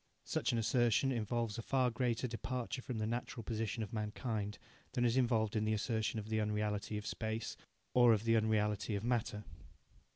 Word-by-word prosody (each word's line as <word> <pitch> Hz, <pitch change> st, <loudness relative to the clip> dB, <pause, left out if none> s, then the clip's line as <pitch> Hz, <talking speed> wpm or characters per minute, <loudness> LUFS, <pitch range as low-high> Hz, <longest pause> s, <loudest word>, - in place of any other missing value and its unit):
Such -, -, 0 dB
an 120 Hz, -, 0 dB
assertion 120 Hz, +2 st, +3 dB
involves 115 Hz, -1 st, -1 dB
a -, -, -1 dB
far 130 Hz, +1 st, +2 dB
greater 120 Hz, +1 st, 0 dB
departure 125 Hz, +2 st, -3 dB
from 125 Hz, -2 st, -4 dB
the 110 Hz, -, 0 dB
natural 120 Hz, 0 st, -3 dB
position 110 Hz, 0 st, -2 dB
of 110 Hz, -, -7 dB
mankind 105 Hz, -1 st, -2 dB, 0.4 s
than 120 Hz, -2 st, +2 dB
is 120 Hz, 0 st, +3 dB
involved 115 Hz, -4 st, +2 dB
in 110 Hz, -, +2 dB
the 110 Hz, 0 st, +1 dB
assertion 110 Hz, +1 st, -1 dB
of 105 Hz, 0 st, -7 dB
the 110 Hz, 0 st, +1 dB
unreality 105 Hz, 0 st, -1 dB
of 105 Hz, -, -5 dB
Space 110 Hz, 0 st, -3 dB, 0.4 s
or 120 Hz, -1 st, +7 dB
of 110 Hz, -1 st, +3 dB
the 115 Hz, 0 st, +4 dB
unreality 105 Hz, -1 st, +1 dB
of 100 Hz, -, -3 dB
Matter. 115 Hz, -3 st, 0 dB
110 Hz, 185 wpm, -36 LUFS, 105-120 Hz, 0.4 s, or